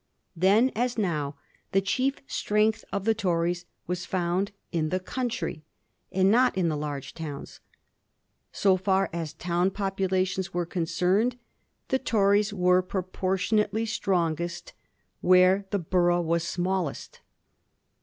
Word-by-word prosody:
Then 200 Hz, +9 st, +4 dB
as 245 Hz, +2 st, 0 dB
now 155 Hz, -8 st, -1 dB, 0.4 s
the 195 Hz, -, +5 dB
chief 255 Hz, +8 st, 0 dB
strength 215 Hz, -1 st, +1 dB
of 200 Hz, 0 st, -2 dB
the 225 Hz, -, +4 dB
Tories 175 Hz, -4 st, -1 dB, 0.2 s
was 180 Hz, 0 st, -3 dB
found 185 Hz, +2 st, 0 dB, 0.2 s
in 155 Hz, -2 st, 0 dB
the 185 Hz, -, 0 dB
country, 185 Hz, -7 st, -3 dB, 0.5 s
and 190 Hz, +1 st, +3 dB
not 245 Hz, -2 st, +3 dB
in 175 Hz, -3 st, +2 dB
the 155 Hz, -, -1 dB
large 145 Hz, -2 st, -5 dB
towns. 150 Hz, -4 st, -7 dB, 0.9 s
So 190 Hz, -2 st, +3 dB
far 190 Hz, +1 st, +1 dB
as 165 Hz, -3 st, -4 dB
town 175 Hz, +2 st, 0 dB
populations 190 Hz, -1 st, -1 dB
were 175 Hz, -1 st, 0 dB
concerned, 180 Hz, +7 st, 0 dB, 0.5 s
the 265 Hz, -, +2 dB
Tories 205 Hz, -3 st, +2 dB
were 180 Hz, -2 st, +3 dB
proportionately 190 Hz, +4 st, -1 dB
strongest 175 Hz, -5 st, -1 dB, 0.5 s
where 185 Hz, +2 st, +4 dB
the 205 Hz, -, 0 dB
borough 175 Hz, 0 st, +2 dB
was 170 Hz, 0 st, 0 dB
smallest. 180 Hz, -2 st, -3 dB
185 Hz, 125 wpm, -27 LUFS, 175-200 Hz, 0.9 s, the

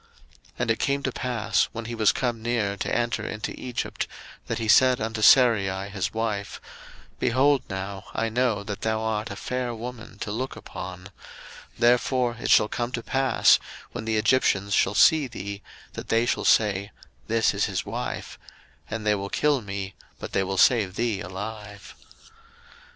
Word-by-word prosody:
01:012:011 -, -, -31 dB, 0.5 s
And 120 Hz, -2 st, 0 dB
it 110 Hz, -, 0 dB
came 140 Hz, 0 st, 0 dB
to 130 Hz, -, -1 dB
pass, 120 Hz, -3 st, 0 dB
when 115 Hz, 0 st, -6 dB
he 120 Hz, -, -5 dB
was 110 Hz, -2 st, +4 dB
come 120 Hz, -3 st, -2 dB
near 110 Hz, -4 st, 0 dB
to 100 Hz, -, -4 dB
enter 120 Hz, -2 st, 0 dB
into 110 Hz, 0 st, -4 dB
Egypt, 125 Hz, -2 st, -4 dB, 0.4 s
that -, -, -2 dB
he 115 Hz, -, -3 dB
said 130 Hz, +3 st, +5 dB
unto 110 Hz, 0 st, -3 dB
Sarai 100 Hz, -6 st, +5 dB
his 95 Hz, -2 st, -2 dB
wife, 110 Hz, -3 st, -3 dB, 0.6 s
Behold 135 Hz, +2 st, +3 dB
now, 95 Hz, 0 st, -5 dB
I 115 Hz, -, 0 dB
know 115 Hz, -2 st, 0 dB
that 100 Hz, -1 st, -6 dB
thou 110 Hz, 0 st, 0 dB
art 110 Hz, 0 st, -2 dB
a 100 Hz, -, -6 dB
fair 125 Hz, +2 st, -3 dB
woman 120 Hz, 0 st, -8 dB
to 105 Hz, -, -5 dB
look 130 Hz, +5 st, -3 dB
upon: 90 Hz, -1 st, -8 dB
01:012:012 95 Hz, -, -12 dB, 0.7 s
Therefore 120 Hz, 0 st, +2 dB
it 125 Hz, -, -3 dB
shall 105 Hz, -, +6 dB
come 120 Hz, +2 st, -3 dB
to 115 Hz, -, -3 dB
pass, 135 Hz, +2 st, +4 dB, 0.3 s
when 110 Hz, -, -6 dB
the 110 Hz, -1 st, 0 dB
Egyptians 100 Hz, -4 st, +2 dB
shall 100 Hz, -, +2 dB
see 155 Hz, +3 st, +5 dB
thee, 100 Hz, -3 st, -7 dB, 0.3 s
that -, -, -7 dB
they 115 Hz, +1 st, +3 dB
shall -, -, -1 dB
say, 100 Hz, -2 st, +3 dB, 0.4 s
This 115 Hz, 0 st, +2 dB
is -, -, +1 dB
his -, -, -3 dB
wife: -, -, -5 dB, 0.5 s
and 110 Hz, -1 st, -4 dB
they 105 Hz, -, +4 dB
will 100 Hz, -1 st, -3 dB
kill 145 Hz, +1 st, +1 dB
me, 100 Hz, -2 st, -5 dB, 0.2 s
but -, -, -7 dB
they 95 Hz, -, +1 dB
will 95 Hz, 0 st, -3 dB
save 100 Hz, -4 st, +4 dB
thee 115 Hz, -4 st, -1 dB
alive. 100 Hz, +2 st, -7 dB
110 Hz, 175 wpm, -25 LUFS, 100-120 Hz, 0.7 s, shall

